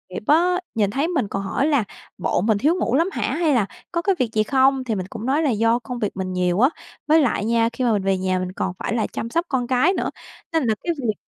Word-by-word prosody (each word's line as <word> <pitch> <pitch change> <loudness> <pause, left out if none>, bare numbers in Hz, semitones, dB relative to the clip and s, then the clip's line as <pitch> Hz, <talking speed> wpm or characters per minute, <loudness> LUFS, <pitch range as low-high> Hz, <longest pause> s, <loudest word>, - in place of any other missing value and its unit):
nghiệp - - -5
á, 355 +4 +4 0.2
nhìn 210 -3 +2
thấy 280 +8 0
mình 295 - 0
còn 195 0 -3
hỏi 230 +9 0
là 285 -7 +2 0.3
bộ 180 - 0
mình 215 +1 +2
thiếu 305 +11 +2
ngủ 260 -9 0
lắm 335 +6 +2
hả? - - -4
Hay 320 -2 +2
là 235 -6 +3 0.3
có 340 -1 -1
cái 390 +2 +1
việc 250 - +1
gì 215 - +2
không? 265 +3 +3
Thì 230 -4 -2
mình 185 -2 -4
cũng 225 0 -7
nói 280 +5 +1
là 295 - +2
do 230 +1 +2
công 245 0 -6
việc 210 -3 -1
mình 185 -1 -3
nhiều 180 0 +1
á, 260 +4 +5 0.4
với 315 +1 +5
lại 235 -6 0
nha 230 0 +2
khi 260 - -3
mà 240 - +3
mình 200 -2 0
về 195 0 +1
nhà 185 0 0
mình 185 0 -3
còn 185 0 -3
phải - - -2
là 225 - 0
chăm 230 - -5
sóc 335 +8 0
con 250 -3 -1
cái 260 +9 +3
nữa, - - -1 0.4
nên 325 -2 +2
là 220 - +2
cái 345 - 0
việc 225 -4 0
240 Hz, 280 wpm, -22 LUFS, 210-295 Hz, 0.4 s, á